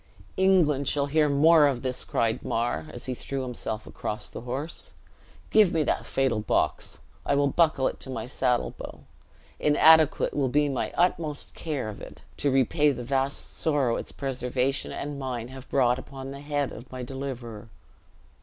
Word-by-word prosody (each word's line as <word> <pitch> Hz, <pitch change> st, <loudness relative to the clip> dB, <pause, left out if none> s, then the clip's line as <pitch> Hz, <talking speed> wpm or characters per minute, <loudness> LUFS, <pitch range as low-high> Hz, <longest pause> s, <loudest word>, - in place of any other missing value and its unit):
"England 170 Hz, -8 st, +3 dB
shall 140 Hz, +1 st, +2 dB
hear 150 Hz, +1 st, +2 dB
more 150 Hz, +2 st, +6 dB
of 130 Hz, -4 st, -2 dB
this!" 130 Hz, -1 st, -2 dB
cried 115 Hz, -1 st, 0 dB
Mar, 115 Hz, -9 st, -1 dB
as -, -, -9 dB
he 130 Hz, -, -2 dB
threw 135 Hz, +2 st, -4 dB
himself 115 Hz, -3 st, -5 dB
across 105 Hz, -, -5 dB
the -, -, -7 dB
horse. 135 Hz, +7 st, -6 dB, 0.6 s
"Give 215 Hz, -4 st, +6 dB
me 160 Hz, -2 st, +1 dB
that -, -, -1 dB
fatal 135 Hz, -5 st, +1 dB
box; 105 Hz, -, -1 dB, 0.3 s
I 140 Hz, -, +1 dB
will 140 Hz, 0 st, +3 dB
buckle 155 Hz, -3 st, +3 dB
it -, -, -4 dB
to -, -, -7 dB
my 130 Hz, -, -4 dB
saddle 125 Hz, -1 st, 0 dB
bow. -, -, -9 dB, 0.6 s
Inadequate 155 Hz, +1 st, +5 dB
will 140 Hz, -3 st, +1 dB
be 145 Hz, +2 st, +2 dB
my 135 Hz, -, -2 dB
utmost 165 Hz, -4 st, 0 dB
care 150 Hz, -8 st, -3 dB
of 105 Hz, -, -7 dB
it, -, -, -11 dB, 0.2 s
to 145 Hz, -, +1 dB
repay 135 Hz, +3 st, +3 dB
the 125 Hz, -2 st, -5 dB
vast 135 Hz, +2 st, -1 dB
sorrow 140 Hz, -7 st, +1 dB
its -, -, -6 dB
preservation 130 Hz, 0 st, -2 dB
and 145 Hz, 0 st, -5 dB
mine 125 Hz, -3 st, -4 dB
have 130 Hz, 0 st, -11 dB
brought 125 Hz, -2 st, +2 dB
upon 135 Hz, 0 st, -8 dB
the 140 Hz, 0 st, -8 dB
head 145 Hz, -1 st, -1 dB
of 120 Hz, +3 st, -11 dB
my 130 Hz, -1 st, -6 dB
deliverer." 120 Hz, -4 st, -6 dB
135 Hz, 175 wpm, -27 LUFS, 125-145 Hz, 0.6 s, more